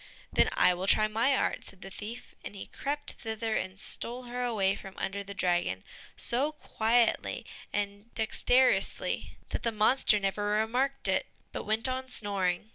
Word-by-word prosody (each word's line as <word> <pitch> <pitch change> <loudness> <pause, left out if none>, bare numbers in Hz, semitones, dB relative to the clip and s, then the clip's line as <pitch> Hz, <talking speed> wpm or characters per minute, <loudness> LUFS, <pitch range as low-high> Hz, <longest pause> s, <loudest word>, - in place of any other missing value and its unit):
"Then - - +4
I 180 - +5
will 180 +2 -3
try 215 +2 +5
my 230 +6 +2
art," - - 0
said 190 0 -7
the 195 - -9
thief, 220 +5 -8
and - - -7
he 195 - -6
crept 290 +1 -3
thither 220 0 -2
and 190 +1 -3
stole 245 +4 +1
her 245 0 -4
away 205 -5 +2
from 195 -1 -9
under 200 +1 -3
the 200 0 -8
dragon, 175 - 0 0.3
so 275 +6 +2
quietly 230 -5 +1 0.3
and 205 +2 -3
dexterously, 245 +3 +2
that - - -3
the 230 - 0
monster 215 0 +4
never 195 +1 -1
remarked 255 +5 0
it, - - +1 0.2
but - - -5
went 220 +3 +3
on 260 0 -3
snoring. 200 -4 0
220 Hz, 165 wpm, -30 LUFS, 195-245 Hz, 0.3 s, I